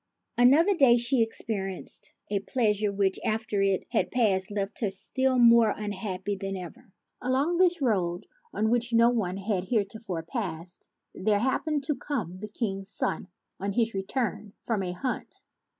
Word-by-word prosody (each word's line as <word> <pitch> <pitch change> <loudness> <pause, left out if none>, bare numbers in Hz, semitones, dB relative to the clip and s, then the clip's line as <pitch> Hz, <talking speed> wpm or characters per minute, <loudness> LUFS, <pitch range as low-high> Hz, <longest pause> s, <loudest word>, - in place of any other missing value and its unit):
Another 295 +11 +5
day 260 -7 +6
she 240 +1 +1
experienced 205 -4 -4 0.2
a 200 - +1
pleasure 210 -1 0
which, 195 -1 0
after 215 -2 -1
it 195 -1 +1
had 235 - +1
passed, 200 -6 +1
left 200 0 -3
her 210 - +1
still 260 +7 0
more 235 -2 +6
unhappy 205 -1 -3
than 195 0 -4
ever. 200 +6 -10 0.3
Along 270 +7 +1
this 350 -4 +3
road, 185 -6 0 0.3
on 220 +1 0
which 240 0 +1
no 230 +1 +6
one 195 -6 -1
had 195 -2 -1
heretofore 205 -5 -2
passed, 175 -3 -5 0.2
there 205 +2 +1
happened 280 +6 0
to 300 - 0
come 225 - -4
the 215 - -6
King's 195 -3 -3
son - - -2 0.3
on 200 0 -2
his 230 +1 +1
return 205 +1 -2
from 225 -4 -1
a 180 -2 -2
hunt. 250 +8 -4
215 Hz, 155 wpm, -27 LUFS, 195-245 Hz, 0.3 s, day